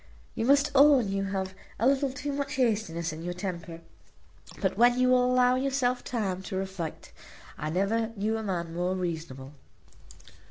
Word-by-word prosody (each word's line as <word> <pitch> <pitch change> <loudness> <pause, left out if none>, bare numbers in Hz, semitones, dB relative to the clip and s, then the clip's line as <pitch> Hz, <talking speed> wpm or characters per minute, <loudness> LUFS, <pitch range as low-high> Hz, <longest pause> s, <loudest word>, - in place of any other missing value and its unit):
You 225 - -2
must 280 +2 +4
own 275 -6 +6
you 195 0 -1
have 190 -1 -3 0.2
a 230 - 0
little 275 0 +2
too 275 +2 -4
much 280 0 -3
hastiness 205 -10 0
in 160 - -8
your 175 +1 -4
temper; 170 -3 -6 0.8
but - - 0
when 240 +1 +4
you 255 0 +4
will 250 0 +5
allow 250 0 +4
yourself 255 -1 0
time 195 -6 -2
to 190 0 -6
reflect 190 -4 -5 0.4
I 155 - -4
never 200 +7 0
knew 215 +2 -1
a 220 - -2
man 175 -5 -3
more 180 +2 -1
reasonable." 160 -7 -5
205 Hz, 165 wpm, -28 LUFS, 175-255 Hz, 0.8 s, own